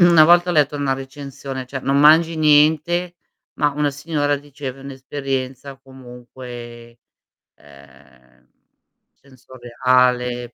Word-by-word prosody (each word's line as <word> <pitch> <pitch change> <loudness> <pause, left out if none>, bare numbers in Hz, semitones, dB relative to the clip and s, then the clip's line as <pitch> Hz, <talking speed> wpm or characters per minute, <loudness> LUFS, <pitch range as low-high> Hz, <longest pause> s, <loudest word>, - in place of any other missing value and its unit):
una 170 -3 +6
volta 175 +1 +4
ho - - -1
letto 150 -2 +1
una 140 -2 -1
recensione, 135 0 -8
cioè 130 +1 -6
non 135 +1 0
mangi 160 +3 +5
niente, 155 +3 +2 0.4
ma 145 -1 +1
una 145 0 -1
signora 145 0 -2
diceva:"È 140 -2 -9
un'esperienza 135 0 -6
comunque, 120 -2 -12 0.6
ehm, 70 -3 -21 0.7
sensoriale, 125 -1 -2
135 Hz, 105 wpm, -19 LUFS, 125-145 Hz, 0.7 s, una